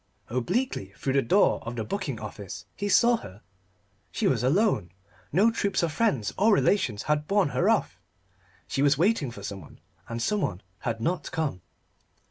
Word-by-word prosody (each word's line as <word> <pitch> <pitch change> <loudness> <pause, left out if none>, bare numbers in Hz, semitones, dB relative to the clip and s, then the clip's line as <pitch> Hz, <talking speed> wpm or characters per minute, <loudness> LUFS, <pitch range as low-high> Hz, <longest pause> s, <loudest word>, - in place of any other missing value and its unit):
Obliquely 125 - -1
through 135 - -1
the 135 - +4
door 190 - +3
of 115 +1 -6
the 115 - -2
booking 140 - -3
office 105 -3 -8
he 205 +1 -3
saw 235 +5 +5
her. 100 - -12 0.7
She - - -2
was 125 - +2
alone. 150 - +2 0.4
No 215 +5 +4
troops 200 -5 0
of 165 - +1
friends 150 - 0
or 220 +3 +5
relations 190 - +2
had 150 0 0
borne 200 -6 +2
her - - +1
off. - - +1 0.7
She 135 - -2
was 145 -1 +4
waiting 175 - +2
for 105 -4 -10
someone; 100 -1 -8 0.3
and 115 0 -3
someone 120 - -1 0.2
had 115 -1 -3
not 175 +9 -1
come. 150 - -2
145 Hz, 165 wpm, -27 LUFS, -, 0.7 s, saw